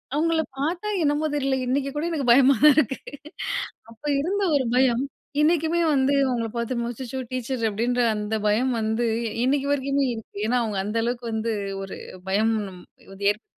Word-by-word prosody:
அவுங்கள 325 +1 +2 0.2
பாத்தா, 340 +9 -2 0.2
என்னமோ 295 +1 +1
தெரில! 275 -2 +1
இன்னைக்கு 270 +2 0
கூட 295 +2 -1
எனக்கு 295 -6 -2
பயமா 265 +3 +7
தான் 300 -1 +9
இருக்கு. 265 -3 +2 0.9
அப்போ 230 +6 -10
இருந்த 390 +8 0
ஒரு 270 -2 +2
பயம், 250 -2 +3 0.4
இன்னைக்குமே 325 +1 +2
வந்து 270 0 +2
அவுங்கள 240 -3 -1
பாத்து 235 +2 -2
"அச்சச்சோ 250 +2 -5
டீச்சரு" 255 -1 -2
அப்டின்ற 240 +4 0
அந்த 210 +1 -2
பயம் 225 +5 +2
வந்து, 220 +2 0 0.4
இன்னைக்கு 275 +2 +1
வரைக்குமே 280 0 +1
இருக்கு. 225 -3 -9
ஏன்னா, 250 +2 +2
அவுங்க 215 -3 -3
அந்த 210 +3 -3
அளவுக்கு 240 +1 -2
வந்து, 220 +1 -1 0.3
ஒரு 195 0 -6 0.3
பயம் 215 +4 +2 0.2
நம் 185 -2 -10 0.3
வந்து 200 +1 -2
ஏற்படுத்தி 210 +2 -2
255 Hz, 165 wpm, -24 LUFS, 225-285 Hz, 0.9 s, தான்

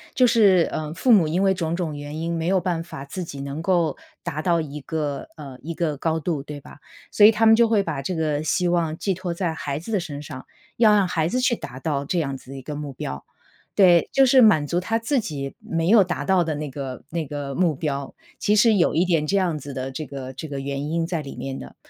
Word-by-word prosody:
就 255 - +5
是， 200 -8 +5
呃， 155 -1 -4
父 245 +8 +2
母 190 -8 +6
因 175 +5 0
为 195 - +4
种 170 -3 -2
种 170 -4 -3
原 145 +1 -7
因 170 +1 -2
没 165 0 -2
有 190 +1 +3
办 175 -2 -2
法 140 -4 -9
自 180 +6 -5
己 140 -4 -8
能 140 +3 -5
够 175 -2 +1 0.3
达 155 - -3
到 170 0 +2
一 150 -2 -5
个， 145 -3 -3
呃， 140 -4 -10
一 165 +2 -6
个 155 -3 -1
高 160 +3 -1
度 160 -2 -2
对 145 +1 -8
吧。 145 - -15 0.3
所 210 - +3
以 210 - +11
他 225 +1 +1
们 225 0 +8
就 235 0 +4
会 215 -3 +2
把 155 -6 -3
这 180 +7 -3
个 155 -2 0
希 175 +3 0
望 165 -2 0
寄 195 - -1
托 180 -1 -4
在 170 -1 -2
孩 140 -3 -4
子 170 +9 -7
的 205 - +2
身 150 -4 -6
上， 130 -3 -8 0.3
要 220 -2 +6
让 200 -2 +3
孩 160 -2 0
子 250 +9 -1
去 250 -1 +2
达 130 - -9
到 140 0 -1
这 175 +5 -2
样 140 -4 -1
子 130 0 -13
的 135 - -7
一 135 - -9
个 150 - -6
目 145 -2 -6
标。 70 - -6 0.5
对， 175 -4 +5
就 270 - +5
是 260 0 +6
满 160 -11 +5
足 175 - 0
他 225 +4 -1
自 270 +4 0
己 140 -9 -5
没 165 0 -2
有 215 -1 +7
达 175 -1 -3
到 190 -2 +3
的 155 -2 -2
那 150 0 -4
个 135 -2 -6
那 165 0 -3
个 140 -1 -5
目 175 -3 +2
标。 140 -2 -3 0.3
其 210 - +2
实 220 +2 +5
有 185 -5 +3
一 170 +3 +3
点 165 -4 +1
这 200 +6 +1
样 175 -5 +1
子 140 0 -8
的 130 0 -4
这 150 +4 -5
个 135 -1 -7
这 130 +5 -7
个 140 - -4
原 140 +1 -4
因 165 +1 0
在 170 -2 -2
里 140 - -8
面 135 +1 -5
的。 65 - -11
160 Hz, 280 characters per minute, -23 LUFS, 145-185 Hz, 0.5 s, 以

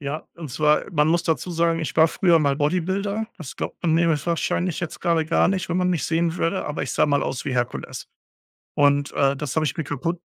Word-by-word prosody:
Ja, 145 +2 -5
und 160 -5 -8
zwar 150 +3 +2
man 150 -3 +2
muss 170 +1 +2
dazu 170 +1 -1
sagen: 165 0 +1
ich 160 - -4
war 160 0 +6
früher 175 -3 +3
mal 140 -3 +1
Bodybuilder. 190 +8 -1
Das 155 -7 -8
glaubt - - -5
man 165 -3 +2
mir 170 +1 +3 0.2
wahrscheinlich 170 +1 -1
jetzt 175 -2 -5
gerade 170 -2 +1
gar 165 +2 +2
nicht, 185 -1 -1
wenn 175 - -1
man 180 0 +1
mich 170 -5 -1
sehen 165 +1 0
würde, 180 +3 -1
aber 150 - -3
ich - - -3
sah - - +3
mal 145 -1 +2
aus 130 - -3
wie 135 - -2
Herkules. 120 -1 -3 0.7
Und 145 0 +2
äh, 140 0 +2
das 140 -1 -4
habe 155 -1 +2
ich 135 - -2
mir 160 - -2
kaputt 165 +5 -3
160 Hz, 230 wpm, -23 LUFS, 145-175 Hz, 0.7 s, war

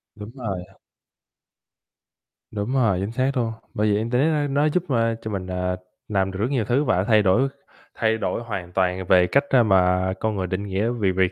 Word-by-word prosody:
Đúng 105 +1 -9
rồi. 100 -8 -4 1.9
Đúng 105 +4 -3
rồi, 115 -8 +2
chính 100 +3 -3
xác 130 +3 0
luôn. 115 -2 0 0.2
Bởi 105 +1 0
vậy 100 - +2
Internet, 125 +6 +1
a, 150 -2 0
nó 140 +2 +1
giúp, 175 +3 0
a, 115 -2 +1
cho 110 - -5
mình, 95 -2 -4
à, 90 0 -2 0.3
làm 95 -2 0
được 95 - -7
rất 110 +5 0
nhiều 125 -6 0
thứ 125 +7 +2
và 95 -10 +1
thay 110 0 +4
đổi 105 +8 +3 0.5
thay 110 -1 +1
đổi 115 - -2
hoàn 95 -6 -5
toàn 95 0 0
về 90 -1 +5
cách, 140 +10 +3
a, 125 -3 +5
mà 95 -2 +3
con 110 -1 -1
người 95 -1 -2
định 95 +2 -3
nghĩa 100 +4 0
về 110 -6 0
việc 95 0 +1
105 Hz, 205 wpm, -23 LUFS, 95-120 Hz, 1.9 s, về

